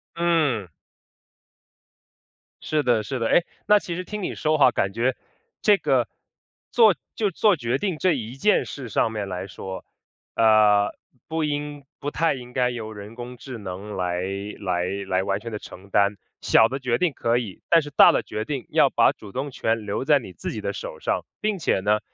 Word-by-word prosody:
嗯。 155 - +1 1.9
是 150 -1 0
的， 120 -3 +2
是 130 +4 -4
的。 115 - 0
诶， 175 - +4 0.2
那 210 0 +6
其 175 -4 -5
实 180 - -4
听 210 +2 -6
你 - - -3
说 155 0 +1
哈， 130 -4 +6
感 100 -3 0
觉 120 +4 +1 0.5
这 210 -2 +5
个 135 -8 +1 0.6
做 220 -6 +6 0.2
就 210 -3 0
做 205 +3 +3
决 125 -3 -1
定 185 -1 -2
这 185 +1 +2
一 120 -2 -5
件 210 +10 +2
事 130 -5 -7
上 110 - +1
面 105 -2 -3
来 95 +1 -4
说， 95 0 -8 0.5
呃， 105 -2 +5 0.3
不 160 0 -1
应 145 -1 -4
不 145 - -4
太 165 -2 +1
应 125 -2 -9
该 125 -1 +2
由 115 -3 -5
人 105 +1 -10
工 125 +1 -8
智 125 0 -8
能 100 +1 -7
来 90 -1 -1 0.4
来 90 -3 -1 0.2
来 95 0 +1
完 100 +1 -1
全 115 +2 -7
地 105 - -4
承 95 +2 -12
担， 100 0 +3 0.3
小 110 - +5
的 135 +3 -4
决 125 -3 0
定 175 -5 +1
可 120 -1 +1
以， 110 -7 -5
但 165 - +6
是 145 - -7
大 - - +8
的 - - +1
决 110 - -4
定 135 0 -4
要 - - +4
把 - - +4
主 100 - -12
动 135 +5 -4
权 115 -3 -1
留 100 +4 -2
在 145 +1 +4
你 95 -7 -10
自 - - -5
己 - - -5
的 - - -3
手 - - -7
上。 - - -1 0.2
并 210 -2 -1
且 - - +1
呢， 105 +2 +2
120 Hz, 210 characters per minute, -24 LUFS, 105-150 Hz, 1.9 s, 大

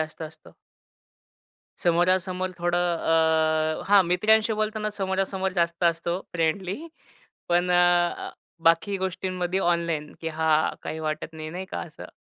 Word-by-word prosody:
जास्त 155 +1 -5
असतो. 155 -1 -18 1.3
समोरासमोर 185 +2 +1
थोडं 175 0 +1 1.0
अ, - - -6
हां, 200 -1 +7
मित्रांशी 215 +5 +3
बोलताना 215 0 -1
समोरासमोर 190 0 -1
जास्त 170 +1 0
असतो 170 +1 0
फ्रेंडली 175 +3 -1 0.7
पण 175 +1 +2
अ, - - +4 0.5
अ, - - -8 0.4
बाकी 170 +5 +2
गोष्टींमध्ये 185 -1 -2
ऑनलाईन, 170 -4 0
की 165 - -3
हां 160 -1 +1
काही 160 - -5
वाटत 155 +1 -3
नाही, 155 -1 -7
नाही 180 +3 -5
का - - -4
असं. 160 -2 -9
175 Hz, 130 wpm, -25 LUFS, 165-190 Hz, 1.3 s, हां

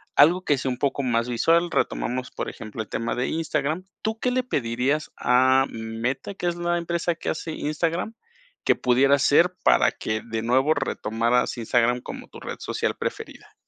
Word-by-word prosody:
algo 175 +5 +5
que 145 - +2
sea 130 - -1
un 125 - -2
poco 140 +1 0
más 120 -2 0
visual, 165 +8 +2
retomamos, 125 +1 -1
por - - -4
ejemplo, 110 0 -7
el - - -19
tema 115 0 -2
de 125 +1 -1
Instagram. 160 +1 -1 0.2
¿Tú 220 +1 -2
qué 250 - +1
le 255 +1 0
pedirías 135 - -1
a 130 +1 +4
Meta, 115 - -4
que 180 - -3
es 175 - 0
la 175 0 0
empresa 170 0 -1
que - - -4
hace 160 +1 -3
Instagram, 165 +8 -2 0.5
que - - +4
pudiera 135 +3 +4
hacer 150 +6 +4
para - - +5
que 110 0 -3
de 115 -1 -3
nuevo 130 +6 +3
retomaras 120 -2 0
Instagram 120 +1 +1
como - - -8
tu - - -12
red - - -6
social - - -2
preferida? - - -6
135 Hz, 180 wpm, -24 LUFS, 120-170 Hz, 0.5 s, algo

